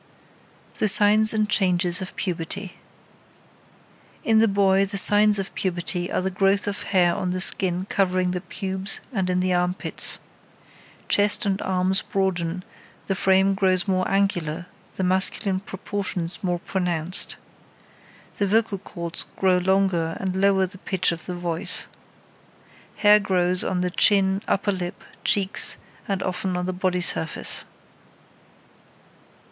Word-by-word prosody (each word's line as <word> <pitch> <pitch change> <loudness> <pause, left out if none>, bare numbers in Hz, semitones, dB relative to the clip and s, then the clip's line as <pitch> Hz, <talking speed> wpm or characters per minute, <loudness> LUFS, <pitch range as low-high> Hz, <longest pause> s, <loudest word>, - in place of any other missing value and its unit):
THE 215 - +2
SIGNS 210 +2 +5
AND 215 -1 +1
CHANGES 180 -3 +1
OF 185 - -7
PUBERTY 180 +2 -3 1.5
In 220 -1 +4
the 225 - +5
boy 195 -1 +3
the 200 +1 -3
signs 210 +1 +5
of 195 -1 -4
puberty 180 -1 -1
are - - 0
the 190 - -1
growth 195 +1 +2
of 205 0 -3
hair 175 -3 +2
on 180 - -2
the 185 +1 -2
skin 185 -1 +2
covering 185 -2 +1
the 180 0 -3
pubes 190 +1 -3
and 190 -4 -1
in 180 0 +1
the 185 0 +1
armpits. 180 +1 0 0.9
Chest 205 +2 +2
and 195 0 0
arms 190 0 +1
broaden, 180 -2 -2 0.4
the 195 - 0
frame 190 +1 +3
grows 185 -2 +1
more 185 -1 +1
angular, 180 -4 0 0.3
the 190 - -2
masculine 190 +1 +1
proportions 190 -3 -4
more 180 -1 0
pronounced. 175 -2 -2 1.0
The 200 - +1
vocal 215 -1 +1
cords 170 -3 -6
grow 185 -1 +3
longer 180 -3 +1
and 190 -1 -2
lower 195 0 +3
the 185 +1 -9
pitch 185 -2 0
of 170 0 -6
the 180 - -4
voice. 170 -2 -2 1.1
Hair 210 0 +6
grows 180 -2 +1
on 180 -1 -1
chin, 195 -1 +3
upper 200 +1 +1
lip, 180 -2 -5 0.2
cheeks, 195 -1 0 0.3
and 195 -2 -1
often 185 0 -2
on 180 - -2
the 185 - -2
body 180 0 0
surface. 165 -2 -3
190 Hz, 135 wpm, -24 LUFS, 180-195 Hz, 1.5 s, Hair